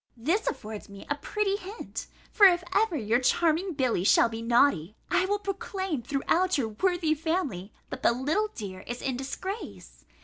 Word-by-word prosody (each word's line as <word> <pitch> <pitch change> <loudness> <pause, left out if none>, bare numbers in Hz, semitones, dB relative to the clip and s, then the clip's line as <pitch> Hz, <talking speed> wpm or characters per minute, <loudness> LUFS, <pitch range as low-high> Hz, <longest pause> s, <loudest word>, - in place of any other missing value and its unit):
This 335 - 0
affords 215 -7 -5
me 200 0 -11
a - - +3
pretty 400 +6 -1
hint; 410 +3 -7 0.2
for 405 - +8
if 355 -1 +2
ever 410 -5 +2
your 230 -1 +1
charming 335 +7 +2
Billy 255 - 0
shall 225 - +5
be 225 0 -6
naughty, 230 - +2 0.2
I 365 0 +3
will 410 +1 +1
proclaim 385 -5 -3
throughout 315 +8 +1
your 235 -5 0
worthy 340 - +1
family, 295 - -2 0.2
that - - -5
the - - +4
little 295 - 0
dear 190 -4 -6
is 240 0 -5
in 265 -2 -1
disgrace! 370 - -6
300 Hz, 170 wpm, -28 LUFS, 235-375 Hz, 0.2 s, for